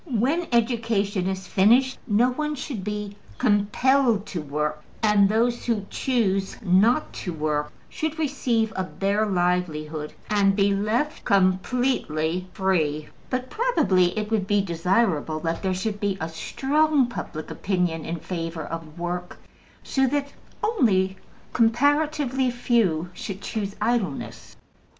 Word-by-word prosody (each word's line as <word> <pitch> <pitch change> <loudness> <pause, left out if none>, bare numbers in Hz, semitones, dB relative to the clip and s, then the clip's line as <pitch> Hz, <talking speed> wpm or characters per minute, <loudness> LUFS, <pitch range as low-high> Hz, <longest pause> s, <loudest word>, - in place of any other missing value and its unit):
When 275 +9 +1
education 225 -5 +1
is 190 0 -3
finished 240 +8 +3
no 235 +3 +3
one 300 +3 -2
should 260 -7 -5
be 210 0 -4 0.2
COMPELLED 230 +1 +2
to 180 -5 -4
work, 150 +1 -3 0.2
and 205 -2 +5
those 235 +3 +1
who 220 -4 0
choose 195 -7 0
not 215 +10 +3
to 180 - -5
work 150 -2 -1 0.2
should 315 0 -3
receive 245 -7 0
a 190 - -1
bare 200 +3 0
livelihood, 170 -5 -1 0.2
and 200 -2 +3
be 200 0 +3
left 225 +10 -1
completely 185 - +1
free; 155 -6 0 0.2
but 255 0 -3
probably 270 - +2
it 215 0 -2
would 210 -4 +1
be 205 0 +3
desirable 170 -3 0
that 165 0 -2
there 190 -1 0
should 205 +2 -3
be 200 -2 -1
a 160 - -3
strong 280 - +1
public 165 -9 -6
opinion 180 -4 -1
in 165 - -3
favor 165 -1 -4
of 165 0 -7
work, 175 +1 -4 0.5
so 265 -1 +1
that 285 +1 -1 0.3
only 200 - +2 0.4
comparatively 270 +2 +2
few 215 -9 +1
should 195 +1 -6
choose 200 -1 -4
idleness. 225 - -2
205 Hz, 130 wpm, -24 LUFS, 180-245 Hz, 0.5 s, and